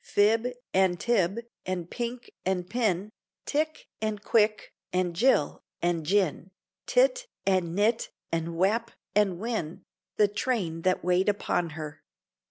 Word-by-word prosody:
Fib, 220 +3 +3 0.3
and 185 -2 +3
Tib, 210 -1 +1 0.2
and 180 -2 -3
Pinck, 240 +4 -5
and 180 -1 -1
Pin, 210 -2 0 0.3
Tick, 310 +2 -1 0.2
and 215 -1 -1
Quick, 215 +1 +2 0.2
and 180 -1 0
Jil, 225 - +3 0.2
and 170 -2 0
Jin, 190 -2 +1 0.4
Tit, - - +3 0.2
and 185 -3 +1
Nit, 220 +3 +2 0.2
and 165 0 -2
Wap, 220 +6 +2 0.2
and 195 -4 +3
Win, 200 -6 -3 0.3
The 210 - +6
train 205 -6 -1
that 185 +2 +1
wait 180 +3 +3
upon 180 -4 0
her. 150 -1 -6
195 Hz, 130 wpm, -28 LUFS, 175-230 Hz, 0.4 s, The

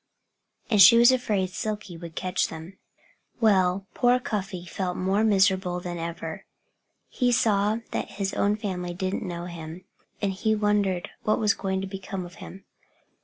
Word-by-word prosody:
And 210 -4 +4
she 215 +5 +10
was 240 +2 +7
afraid 210 -7 0
Silkie 210 -2 -4
would 165 0 -9
catch 185 -1 0
them. 165 +4 -10 0.6
Well, 190 -3 +3
poor 245 +1 +3
Cuffy 195 -6 -4
felt 180 0 -3
more 190 +3 +1
miserable 190 -3 +2
than 175 -1 -5
ever. 165 -1 -5 0.6
He 250 -2 0
saw 215 -1 +2
that - - -3
his 195 -1 -3
own 205 +1 +1
family 180 -4 -4
didn't 185 +1 -2
know 175 -1 -5
him. 170 +1 -8 0.3
And 200 -2 0
he 220 +3 0
wondered 205 -4 0
what 215 - +1
was 210 -2 +2
going 190 -1 -2
to 195 - -4
become 190 -1 -6
of 175 - -12
him. 195 - -10
190 Hz, 160 wpm, -26 LUFS, 180-210 Hz, 0.6 s, she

